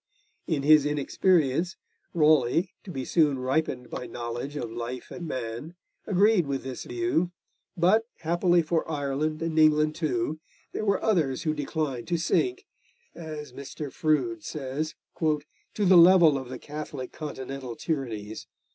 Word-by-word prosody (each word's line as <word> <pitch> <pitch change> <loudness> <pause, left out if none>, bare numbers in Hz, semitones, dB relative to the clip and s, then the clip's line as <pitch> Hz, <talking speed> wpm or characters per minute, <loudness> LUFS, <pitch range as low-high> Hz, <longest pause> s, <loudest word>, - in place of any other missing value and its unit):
In 150 -5 0
his 150 0 +7
inexperience, 155 +2 +1 0.4
Raleigh, 155 +1 +3
to - - -11
be 135 -7 -4
soon 150 -5 +3
ripened 130 -1 -1
by 125 - -5
knowledge 120 +4 -5
of 120 -6 -4
life 120 +2 -6
and 170 - -6
man, 130 +6 -5 0.3
agreed 200 -3 +4
with 135 -1 -2
this 130 -1 -6
view, 355 - 0 0.5
but, 210 +7 +3
happily 175 +1 +3
for 160 0 -1
Ireland 150 +1 -1
and 160 -1 0
England 155 0 +5
too, 155 -2 -1 0.3
there 215 - -3
were 200 -2 +1
others 160 -12 +1
who 155 - +1
declined 145 -4 -3
to 175 - +1
sink, 370 - 0 0.5
as 155 -4 -8
Mr. 140 +1 -7
Froude 320 - 0
says, 150 +2 -4 0.2
'to 155 -2 +2 0.4
the 190 -3 +5
level 170 -3 +8
of 130 -2 -4
the 130 - -5
Catholic 145 -3 -7
continental 135 -5 -6
tyrannies.' 110 -10 -4
155 Hz, 140 wpm, -27 LUFS, 135-170 Hz, 0.5 s, level